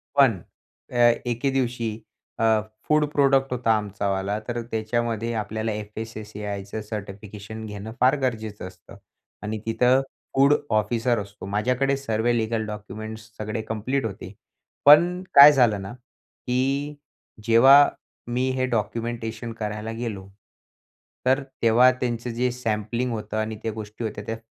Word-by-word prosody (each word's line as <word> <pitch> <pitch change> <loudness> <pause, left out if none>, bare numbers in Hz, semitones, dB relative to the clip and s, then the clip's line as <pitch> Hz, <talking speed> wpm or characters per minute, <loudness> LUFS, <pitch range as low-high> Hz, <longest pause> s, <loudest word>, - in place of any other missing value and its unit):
पण, 135 -7 +5 0.5
अ, - - -8 0.3
एके 120 +3 -1
दिवशी, 125 -3 -1 0.5
अ, 110 -1 +3 0.3
फूड 150 0 +3
प्रोडक्ट 135 -1 +3
होता 120 -2 +1
आमचावाला, 100 -1 -2
तर 120 0 -2
त्याच्यामध्ये 115 +1 -1
आपल्याला 110 0 -2
एफ-एस-एस-सी-आयचं 105 -1 -6
सर्टिफिकेशन 105 +1 -8
घेणं 105 +1 -7
फार 130 +3 +5
गरजेचं 110 -6 -3
असतं. 90 -2 -15 0.5
आणि 105 +1 -3
तिथं 125 +4 +3 0.3
फूड 140 +2 +5 0.2
ऑफिसर 115 +2 +1
असतो. 100 0 -8
माझ्याकडे 125 +7 0
सर्वे 120 -2 0
लीगल 110 0 -1
डॉक्युमेंट्स 110 +1 -7
सगळे 110 +1 -3
कंप्लीट 115 +5 -2
होते. 100 -2 -6 0.5
पण 175 +5 +6
काय 140 +1 +11
झालं 120 -8 +3
ना, 95 +3 -7
की 135 +3 -4 0.5
जेव्हा 135 +5 +7 0.4
मी 125 +2 0
हे 130 0 +1
डॉक्युमेंटेशन 115 0 -3
करायला 105 +1 -4
गेलो, 105 -5 -5 1.0
तर 130 +2 +3 0.2
तेव्हा 120 +3 +6
त्यांचं 120 -1 -3
जे 125 +2 0
सॅम्पलिंग 115 0 -2
होतं 110 -1 -4
आणि 110 0 -2
त्या 115 - -1
गोष्टी 110 +1 -7
होत्या, 105 -2 -4
त्या 115 +1 -4
115 Hz, 125 wpm, -24 LUFS, 105-125 Hz, 1.0 s, काय